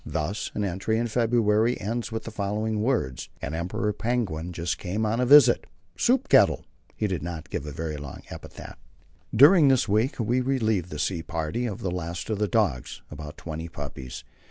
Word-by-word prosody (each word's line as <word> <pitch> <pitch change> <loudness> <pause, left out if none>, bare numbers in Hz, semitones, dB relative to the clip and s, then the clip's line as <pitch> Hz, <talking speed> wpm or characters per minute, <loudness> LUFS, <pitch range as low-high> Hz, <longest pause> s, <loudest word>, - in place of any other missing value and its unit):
Thus 80 +6 -3
an 105 - -1
entry 100 +4 -1
in 120 - 0
February 115 0 +2
ends 115 +3 -3
with 110 0 -3
the 115 - -7
following 105 +1 -2
words: 110 - -1
"An 70 - -5
Emperor 105 +6 -2
penguin 100 -8 -2
just 85 0 -3
come 100 +4 -2
on 110 +2 0
a 125 - +1
visit 135 -3 +7 0.3
soup 260 +3 +2
kettle." - - +4 0.3
He 110 - -1
did 95 -7 -1
not 85 -1 -6
get 75 - -4
a - - -5
very 80 +1 -4
long 70 -2 -8
epitaph. - - -10 0.5
During 145 - +7
this 130 -4 +3
week 110 +7 +1
we 120 +3 +1
relieved 110 -9 0
the 75 - -6
sea 80 +3 -1
party 85 +9 -3
of 100 -4 -5
the 95 - -2
last 85 +3 -4
of 105 - -1
the 105 - +1
dogs 85 - -1
about 75 0 -8
twenty 80 0 -6
puppies. 65 -6 -7
105 Hz, 185 wpm, -26 LUFS, 80-115 Hz, 0.5 s, visit